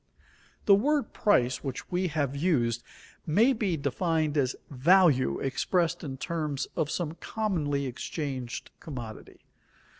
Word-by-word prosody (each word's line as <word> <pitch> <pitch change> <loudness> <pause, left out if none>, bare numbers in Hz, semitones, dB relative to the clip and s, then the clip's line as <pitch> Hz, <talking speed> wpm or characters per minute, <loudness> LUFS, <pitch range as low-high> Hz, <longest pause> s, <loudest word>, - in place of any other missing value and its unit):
_ - - -30
The 200 - +7
word 285 +8 +2
"price" 130 - +2
which 135 +5 -5
we 180 +1 +1
have 145 -4 -1
used, 125 -8 +1 0.5
may 220 - +4
be 200 -8 0
defined 155 +2 0
as 130 -3 +1 0.2
value 140 - +4
expressed 170 +5 0
in 135 -3 -5
terms 150 -3 -2
of 155 -3 0
some 165 -2 -2
commonly 155 -12 -1
exchanged 130 -1 -4
commodity. 120 -8 -9
150 Hz, 125 wpm, -28 LUFS, 135-180 Hz, 0.5 s, The